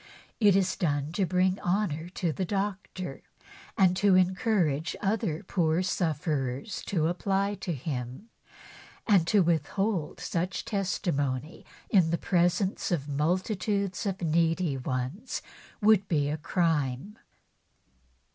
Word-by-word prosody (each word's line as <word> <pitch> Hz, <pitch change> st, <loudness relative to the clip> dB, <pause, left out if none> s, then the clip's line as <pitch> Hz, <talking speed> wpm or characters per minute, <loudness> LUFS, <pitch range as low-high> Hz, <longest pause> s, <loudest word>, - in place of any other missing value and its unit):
It 205 Hz, -4 st, +5 dB
is 190 Hz, -1 st, +2 dB
done 145 Hz, -3 st, -1 dB
to 185 Hz, +2 st, 0 dB
bring 185 Hz, +1 st, +2 dB
honour 175 Hz, -3 st, -1 dB
to 180 Hz, -2 st, -1 dB
the 190 Hz, -, -2 dB
doctor, 195 Hz, -4 st, -3 dB, 0.6 s
and 185 Hz, -2 st, +4 dB
to 200 Hz, -2 st, +4 dB
encourage 185 Hz, -, +1 dB
other 195 Hz, -6 st, -1 dB
poor 165 Hz, -1 st, +1 dB
sufferers 150 Hz, -, -2 dB
to 160 Hz, -5 st, +1 dB
apply 195 Hz, +3 st, 0 dB
to 175 Hz, -, -2 dB
him; 130 Hz, -, -5 dB, 0.8 s
and 190 Hz, -6 st, +4 dB
to 200 Hz, +1 st, +4 dB
withhold 170 Hz, +2 st, 0 dB
such 180 Hz, +2 st, -2 dB
testimony 155 Hz, -, -2 dB, 0.2 s
in 185 Hz, -6 st, +5 dB
the 170 Hz, -, +1 dB
presence 180 Hz, +2 st, +1 dB
of 155 Hz, -7 st, -1 dB
multitudes 185 Hz, +6 st, -1 dB
of 190 Hz, -2 st, -3 dB
needy 165 Hz, -1 st, +1 dB
ones 130 Hz, -, -3 dB, 0.4 s
would 210 Hz, -2 st, +4 dB
be 145 Hz, -5 st, +1 dB
a 155 Hz, -, -2 dB
crime. 160 Hz, -, -1 dB
175 Hz, 120 wpm, -28 LUFS, 155-195 Hz, 0.8 s, It